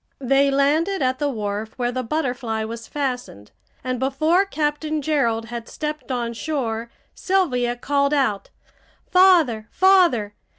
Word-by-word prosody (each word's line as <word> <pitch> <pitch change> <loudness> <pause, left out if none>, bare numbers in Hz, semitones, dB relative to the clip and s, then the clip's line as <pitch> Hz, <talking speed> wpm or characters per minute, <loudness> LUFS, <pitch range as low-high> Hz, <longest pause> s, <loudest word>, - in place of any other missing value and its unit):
They 275 +1 +2
landed 295 +6 +1
at 255 0 0
the 290 -1 0
wharf 215 -2 -4
where 245 -1 -1
the 255 +1 -2
Butterfly 245 -4 -2
was 230 +1 -7
fastened, 250 - -4 0.3
and 255 -1 -2
before 310 +8 +2
Captain 310 -3 -2
Gerald 235 -7 0
had 235 -1 -6
stepped 300 -2 -5
on 240 -2 -2
shore 235 -4 -3 0.2
Sylvia 255 -11 0
called 280 +3 0
out: 220 -9 0 0.6
"Father! 335 - +4
Father! 350 - +3
265 Hz, 130 wpm, -22 LUFS, 235-305 Hz, 0.6 s, Father